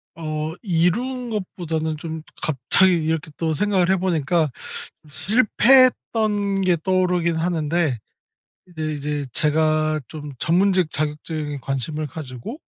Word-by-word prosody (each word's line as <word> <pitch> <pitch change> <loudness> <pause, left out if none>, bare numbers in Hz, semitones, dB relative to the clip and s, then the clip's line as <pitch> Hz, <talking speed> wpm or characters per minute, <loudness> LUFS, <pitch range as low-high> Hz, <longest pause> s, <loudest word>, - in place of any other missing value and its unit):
어 155 -1 -3
이룬 235 +8 0
것보다는 165 -7 -3
좀 160 0 -6 0.2
갑자기 160 +6 +3
이렇게 160 -1 -1
또 160 -1 0
생각을 185 +1 +2
해 190 - +3
보니까 170 -3 +1 0.6
실패했던 215 - +3
게 180 -2 +3
떠오르긴 180 -3 +1
하는데. 160 -4 0 0.7
이제 155 -3 -4
이제 145 -1 -3
제가 155 +1 +2
좀 150 -2 -8
전문직 185 +2 +2
자격증에 150 0 -3
관심을 150 +3 -2
가지고 140 - -7
165 Hz, 255 characters per minute, -22 LUFS, 155-185 Hz, 0.7 s, 갑자기